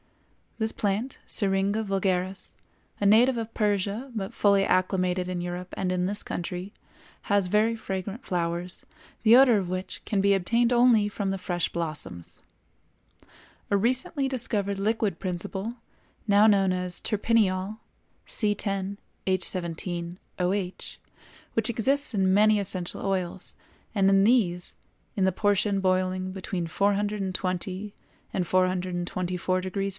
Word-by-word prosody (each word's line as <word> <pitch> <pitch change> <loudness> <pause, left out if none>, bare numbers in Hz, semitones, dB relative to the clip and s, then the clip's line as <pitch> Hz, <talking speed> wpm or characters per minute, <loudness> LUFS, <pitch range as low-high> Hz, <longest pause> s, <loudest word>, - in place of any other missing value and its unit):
This 220 -1 0
plant, 210 +6 -2
Syringa 200 +1 +1
vulgaris, 190 -1 -1 0.5
a 205 - 0
native 235 +5 +5
of 225 0 -4
Persia 210 +4 -1
but 195 -3 -4
fully 200 -1 +3
acclimated 185 -1 +1
in 180 -1 -3
Europe 180 +1 -5
and 185 -1 -1
in 180 0 0
this 205 +2 -1
country, 180 +3 -5 0.5
has 200 -2 +2
very 215 +4 +2
fragrant 200 +1 -5
flowers, 175 0 -3 0.4
the 225 +1 +7
odor 250 -3 +7
of 185 -3 -2
which 185 +1 -5
can 200 -2 0
be 200 0 +4
obtained 230 +6 +2
only 240 -4 +5
from 205 -1 -3
the 195 - -1
fresh 175 -1 -1
blossoms. 155 - -6 1.3
A 200 - +4
recently 260 - 0
discovered 215 -6 -1
liquid 210 -3 0
principle, 190 +5 -4 0.5
now 205 +1 +6
known 195 -3 +4
as 180 -1 -2
terpineol 210 -2 +1 0.5
(C_H_OH), 200 -2 -1 2.6
which 225 0 +2
exists 270 +4 +1
in 190 -2 +2
many 210 +1 +5
essential 185 -3 -2
oils, 185 -2 -2 0.4
and 195 -1 +4
in 195 0 +5
these, 200 -7 +2 0.4
in 195 - +2
the 190 - +3
portion 205 +1 +1
boiling 185 0 0
between 185 -2 -4
420° 195 0 -1 0.4
and 185 - 0
424° 185 +1 -1
F. - - -1
195 Hz, 120 wpm, -27 LUFS, 185-210 Hz, 2.6 s, the